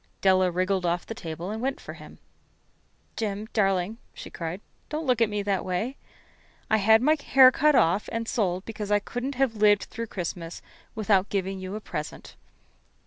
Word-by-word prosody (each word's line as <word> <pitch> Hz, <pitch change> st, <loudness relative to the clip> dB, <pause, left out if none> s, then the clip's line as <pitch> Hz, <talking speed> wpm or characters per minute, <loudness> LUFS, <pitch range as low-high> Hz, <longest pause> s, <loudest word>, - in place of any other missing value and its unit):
Della 185 Hz, -1 st, +4 dB
wriggled 185 Hz, +1 st, 0 dB
off 175 Hz, 0 st, 0 dB
the -, -, -6 dB
table 175 Hz, -3 st, -6 dB
and 220 Hz, +1 st, -4 dB
went 270 Hz, +2 st, -2 dB
for -, -, -9 dB
him. -, -, -13 dB, 1.0 s
"Jim, 210 Hz, -1 st, -3 dB
darling," 195 Hz, +1 st, +1 dB, 0.2 s
she -, -, -9 dB
cried, 170 Hz, +2 st, -5 dB, 0.3 s
"don't 310 Hz, +1 st, -3 dB
look 250 Hz, -3 st, +2 dB
at 225 Hz, -, +4 dB
me 210 Hz, -1 st, -2 dB
that 200 Hz, -2 st, 0 dB
way. 190 Hz, +9 st, -2 dB, 0.8 s
I 220 Hz, -, +5 dB
had 220 Hz, +3 st, +5 dB
my 305 Hz, +3 st, +5 dB
hair 260 Hz, -1 st, +7 dB
cut 300 Hz, +2 st, +3 dB
off 180 Hz, 0 st, +3 dB
and 230 Hz, 0 st, -3 dB
sold 185 Hz, -6 st, 0 dB
it -, -, -37 dB
because 210 Hz, -2 st, -6 dB
I 205 Hz, -, +4 dB
couldn't 245 Hz, +6 st, -4 dB, 0.2 s
live 210 Hz, -1 st, +4 dB
through 230 Hz, 0 st, -6 dB
Christmas 175 Hz, -3 st, -6 dB, 0.3 s
without 205 Hz, -3 st, +2 dB
giving 195 Hz, -1 st, -2 dB
you 185 Hz, +2 st, -6 dB
a -, -, -4 dB
present. 155 Hz, -6 st, -7 dB
205 Hz, 180 wpm, -26 LUFS, 185-225 Hz, 1.0 s, hair